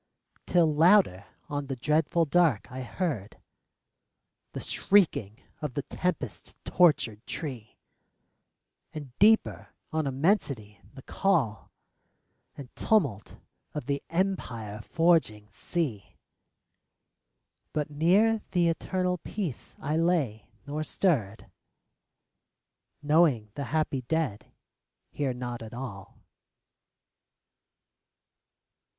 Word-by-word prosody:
Till 165 -4 +3
louder 160 - +4 0.2
on 145 -2 -3
the 135 - -3
dreadful 155 +5 +1
dark 155 - +2
I 130 +1 -5
heard 130 - -4 1.1
The - - -4
shrieking 155 - +2 0.2
of 150 -5 -4
the 145 - -1
tempest 125 - -4
tortured 125 -11 +3
tree, 130 -9 -6 1.2
And 140 -5 -8
deeper 220 +2 +3 0.2
on 155 -2 0
immensity 135 - 0
the 130 - -11
call 150 - 0 0.9
And 135 -3 -10
tumult 140 - +1 0.4
of 150 - -4
the 140 +1 -1
empire 120 - -2
forging 110 - +1
sea; 130 - -4 1.5
But 150 -1 -2
near 200 +9 +3
the 175 -2 +3
eternal 180 +2 -1
Peace 175 - -5
I 150 +3 -1
lay, 160 -11 0 0.2
nor 150 +2 -3
stirred, 125 - 0 1.6
Knowing 145 -8 +3
the 140 - -4
happy 145 -1 -1
dead 130 -5 -2 0.6
hear 140 -3 -1
not 125 -1 -5
at 115 +1 -8
all. 110 -7 -8
145 Hz, 95 wpm, -28 LUFS, 115-170 Hz, 1.6 s, louder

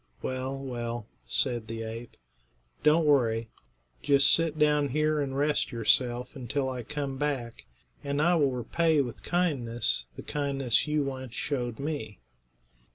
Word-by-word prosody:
"Well, 130 +1 -3
well," 120 -4 -4 0.2
said 120 -4 -1
the 115 0 -5
ape; 115 +1 -8 0.6
"don't 155 +2 +4
worry. 115 -6 +2 0.5
Just 140 -1 +6
sit 165 -2 +2
down 150 -1 +3
here 155 +2 +1
and 135 -1 -3
rest 145 0 +1
yourself 120 +2 +2
until 130 +1 -2
I 130 -1 -4
come 140 +1 -4
back, 135 -6 -3 0.4
and 140 0 -2
I 170 +4 +4
will 150 -5 +3
repay 150 +6 +1
with 125 -3 -5
kindness 120 - 0
the - - -8
kindness 140 -3 0
you 150 -1 +1
once 130 -3 -5
showed 120 -5 -2
me." 140 - -4
135 Hz, 140 wpm, -28 LUFS, 120-150 Hz, 0.6 s, Just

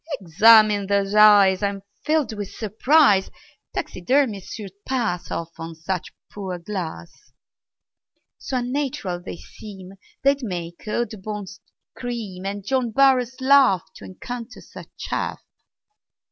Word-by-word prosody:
"Examine 205 +3 +5
those 200 0 0
eyes. 205 -3 +6
I'm 200 -1 -2 0.2
filled 310 -6 +1
with 205 -2 -5
surprise 220 0 +3 0.5
Taxidermists 215 0 -1
should 205 -4 -8
pass 230 -9 -2
Off 165 0 -4
on 165 0 -5
you 165 - -10
such 170 +2 -4 0.2
poor 190 -3 -5
glass; 175 - -7 1.1
So 260 - -3
unnatural 245 -8 -3
they 175 - -8
seem 195 -2 -12 0.3
They'd 275 +1 +3
make 175 -5 -6
Audubon 215 -2 -3 0.5
scream, 215 -7 -5
And 200 0 -5
John 255 0 0
Burroughs 260 0 +3
laugh 260 -9 +5
To - - -13
encounter 235 - -8
such - - -12
chaff. - - -3
210 Hz, 120 wpm, -23 LUFS, 190-245 Hz, 1.1 s, eyes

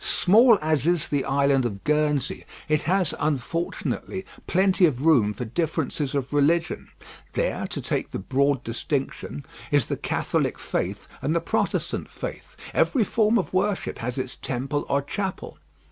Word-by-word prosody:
Small 225 +4 +6
as 155 -2 +1
is 170 -2 +2
the 140 -2 0
island 140 -1 +3
of 100 -5 -4
Guernsey, 150 -2 +1 0.2
it 155 -1 +2
has, 185 -3 +3
unfortunately, 165 +6 -2 0.2
plenty 185 0 +4
of 140 -1 -2
room 125 -11 +5
for 115 +4 -5
differences 150 +1 -1
of 140 0 -2
religion; 160 +4 +2 0.5
there, - - -1
to - - -4
take - - -2
the - - -4
broad 135 +5 +1
distinction, 135 +3 -3 0.2
is 145 -6 +3
the - - -3
Catholic - - -1
faith - - -3
and 155 - 0
the - - +4
Protestant 165 - -1
faith; - - -7 0.2
every 255 -6 +3
form 220 +2 +2
of 190 - -2
worship 195 +1 0
has 125 +2 -3
its 130 - -3
temple 135 +3 -3
or 140 0 +1
chapel. 190 +5 -4
150 Hz, 150 wpm, -25 LUFS, 135-175 Hz, 0.5 s, Small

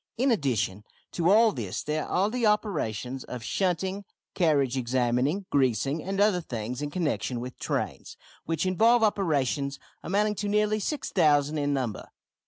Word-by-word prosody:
In 260 +3 +2
addition 125 - 0 0.3
to 170 0 +1
all 220 +2 +6
this 110 -9 -4
there 150 0 -2
are 195 +4 +1
the 240 -2 +1
operations 135 - -1
of 125 -2 -7
shunting, 190 - -1 0.3
carriage 145 -7 +2
examining, 130 +8 0
greasing, 135 +3 +1
and 195 +1 -3
other 205 -3 +3
things 120 -2 -5
in 145 - -2
connexion 145 -6 -2
with 125 +1 -7
trains - - -3 0.3
which 165 +1 -1
involve 225 +6 +4
operations 145 - 0 0.2
amounting 210 +3 +1
to 205 - -2
nearly 210 +1 +2
6000 155 - +1
in 145 0 0
number. 130 -7 -2
155 Hz, 145 wpm, -27 LUFS, 130-200 Hz, 0.3 s, all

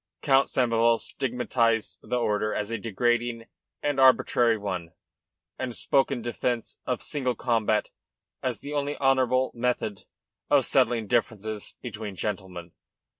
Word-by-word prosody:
Count 135 -1 +4
Samoval 115 -2 +3
stigmatised 120 -3 0
the - - -3
order 105 -2 0
as 105 +1 -2
a 115 - -2
degrading 120 +2 0 0.4
and 145 -2 0
arbitrary 120 -3 +5
one, 90 -5 -4 0.7
and 125 -3 -3
spoke 135 -1 +2
in 130 -5 -3
defence 120 0 -2
of 125 -2 -1
single 130 -5 -1
combat 110 -3 +1 0.5
as 125 -3 -2
the 145 - -6
only 145 0 -1
honourable 130 -1 +2
method 120 -4 -2 0.4
of - - +4
settling 115 -2 +2
differences 110 -2 -1
between 105 -4 -6
gentlemen. 95 -4 -5
115 Hz, 125 wpm, -27 LUFS, 110-130 Hz, 0.7 s, arbitrary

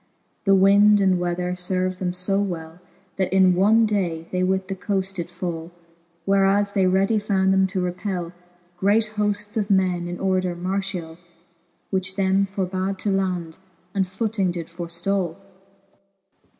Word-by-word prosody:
The 195 -1 +5
winde 200 +2 +6
and 190 -2 +3
weather 180 0 -2 0.2
lerved 185 0 -1
them 180 -1 -1 0.2
(o 195 0 +2
well, 170 -3 -5 0.4
That 185 -2 0
in 190 -1 +5
one 215 +5 +4
day 175 -6 -1
they 180 - -1
with 190 +1 0
the 195 - -3
coaft 195 0 -2
did 170 -1 -4
fall; 175 -2 -5 0.5
Whereas 195 +1 +2
they 190 -2 +3
readie 195 +4 +2
found 195 -2 +1
them 190 0 +3
to 190 0 -2
repell 180 -1 -3 0.4
Great 215 +4 +2
hoftes 210 +1 -1
of 210 -1 -1
men 185 -3 +1
in 175 0 -5
order 185 -2 0
martiall, 180 -2 -3 0.7
Which 190 -1 -1
them 195 0 +2
forbad 190 0 -2
to 205 - -2
land^, 185 -4 -2 0.3
and 195 -2 0
footing 200 0 -1
did 170 -2 -5
forftalL 175 +1 -2
V. - - -24
190 Hz, 150 wpm, -23 LUFS, 180-195 Hz, 0.7 s, winde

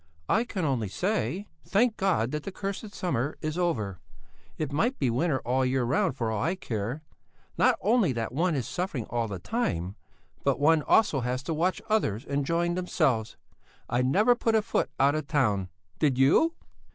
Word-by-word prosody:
"I 225 +3 +2
can 190 -8 -3
only 125 -7 0
say: 185 - -2 0.2
Thank 220 +3 +2
God 170 - +1
that 150 - -2
the 195 - -6
cursed 200 +2 -5
summer 145 -5 -1
is 155 0 -3
over! 110 - -1 0.6
It 150 -2 -3
might 235 - +1
be 130 -4 +1
winter 135 +4 +1
all 130 +2 0
the 130 - +2
year 130 -1 +1
round 160 - +1
for 115 -2 -1
all 110 - -1
I 165 +6 0
care! 120 - -4 0.5
Not - - +3
only 215 - +3
that 115 -1 -3
one 165 +3 +1
is 130 -5 -2
suffering 175 - -3
all 120 -1 0
the 100 -3 -5
time, 95 - -2 0.5
but - - +1
one 155 +2 +4
also 155 -2 +3
has 125 +2 -2
to 165 - -2
watch 175 +4 0
others 135 - 0
enjoying 165 +5 0
themselves! 150 -11 0 0.5
I 120 +1 +1
never 200 - +4
put 230 -2 0
a 220 - +3
foot 225 - 0
out 140 +1 +4
of 155 -1 -3
town; 105 - +1 0.3
did 140 -5 +2
you?" 170 - +4
150 Hz, 185 wpm, -28 LUFS, 120-190 Hz, 0.6 s, one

